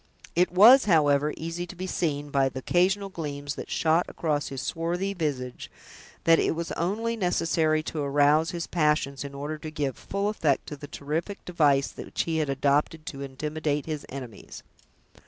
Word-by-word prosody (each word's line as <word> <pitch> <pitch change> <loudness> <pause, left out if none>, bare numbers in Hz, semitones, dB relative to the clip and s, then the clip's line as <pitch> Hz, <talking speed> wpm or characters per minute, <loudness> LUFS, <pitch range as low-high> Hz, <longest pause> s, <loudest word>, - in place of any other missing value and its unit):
It 180 +1 +3
was, 230 +9 +8
however, 150 -5 +3
easy 165 +2 -4
to 185 - -10
be 185 +1 -5
seen, 145 -5 -2
by 135 -1 +3
the 130 - -9
occasional 190 +8 +1
gleams 145 -5 -5
that - - -8
shot 165 +2 +2
across 150 -3 -1
his 135 -1 -5
swarthy 175 +7 -2
visage, 140 -8 -3 0.5
that 165 0 +5
it - - +1
was 170 +1 -4
only 220 +7 -1
necessary 165 -5 +1
to 155 - -4
arouse 145 +3 +3
his 175 -3 -3
passions, 150 -4 0
in 140 -1 -8
order 150 +2 -4
to 155 - -6
give 145 -4 -2
full 200 +1 -3
effect 155 -10 +1
to 150 - -5
the 145 0 -10
terrific 160 +9 -4
device 145 -6 +2
which - - -3
he 165 -1 -1
had 150 -2 0
adopted 145 +3 +1
to 140 -3 -6
intimidate 150 +2 -2
his 155 -3 -4
enemies. 125 -6 -9
155 Hz, 175 wpm, -27 LUFS, 145-175 Hz, 0.5 s, was